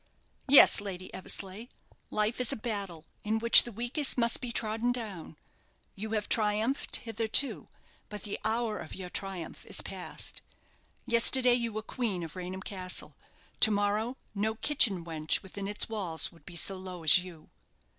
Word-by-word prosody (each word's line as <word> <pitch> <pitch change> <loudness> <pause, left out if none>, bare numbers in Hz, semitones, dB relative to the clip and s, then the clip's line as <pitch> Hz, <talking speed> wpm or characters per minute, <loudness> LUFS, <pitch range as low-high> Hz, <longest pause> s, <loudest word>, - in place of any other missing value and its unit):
"Yes, 270 -5 +7
Lady 185 -2 -7
Eversleigh. 195 +4 -5 0.4
Life 215 +4 -1
is 250 - +3
a - - -1
battle, 200 -8 -5 0.2
in 215 +1 -1
which 235 +1 +9
the 240 - -7
weakest 240 +7 -1
must 235 -1 +1
be 245 -2 -4
trodden 225 +1 -1
down; 205 -10 -7 0.6
you 215 +3 -7
have 210 -1 -2
triumphed 220 +4 +1
hitherto, 225 +4 0 0.4
but 210 -1 -8
the 205 - -5
hour 220 -1 -1
of - - -9
your 180 -2 -8
triumph 190 -4 -6
is - - +2
past. - - -5 0.6
Yesterday 245 +2 +5
you 235 -1 -1
were 215 0 -5
queen 215 -7 -3
of 165 +1 -9
Raynham 185 +1 -7
Castle; 185 -2 -3 0.4
to 220 - +8
morrow 210 +4 -1 0.2
no 215 +2 -2
kitchen 215 - +2
wench 155 -2 0
within 195 +1 -7
its 205 +1 -2
walls 190 -8 -1
will 170 - -19
be 175 - -9
so 190 +3 +1
low 185 -2 -9
as 160 +3 +6
you." 175 -4 -12
210 Hz, 160 wpm, -29 LUFS, 185-230 Hz, 0.6 s, which